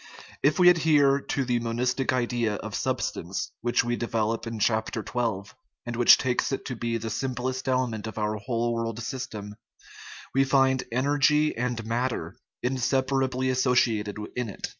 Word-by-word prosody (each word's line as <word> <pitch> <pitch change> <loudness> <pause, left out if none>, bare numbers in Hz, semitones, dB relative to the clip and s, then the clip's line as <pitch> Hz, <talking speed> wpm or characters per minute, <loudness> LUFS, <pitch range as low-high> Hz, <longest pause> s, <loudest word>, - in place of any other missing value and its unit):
If 145 - +3
we 180 -1 +7
adhere 150 -5 +4
to 140 -1 -2
the 120 -1 +1
monistic 125 +3 0
idea 120 -3 0
of - - -7
substance, 90 +4 -2
which 120 +1 +2
we 120 0 -1
develop 115 -1 -1
in 115 0 -4
chap, 110 +1 +1
xii., 120 +2 -3 0.6
and 120 0 -4
which 120 0 +7
takes 125 0 0
it 135 - -3
to 125 - -4
be 115 0 -2
the 115 0 -5
simplest 130 +1 -3
element 125 -4 -1
of 110 - -8
our 105 0 -1
whole 115 +3 -1
world 115 -1 -3
system, 110 -4 -6 0.8
we 135 - +4
find 135 -1 +2
energy 145 +4 +2
and 120 -1 -2
matter 120 +2 -2 0.3
inseparably 130 0 0
associated 120 -5 +1 0.2
in 125 -3 -2
it. 100 - -6
125 Hz, 155 wpm, -26 LUFS, 115-130 Hz, 0.8 s, we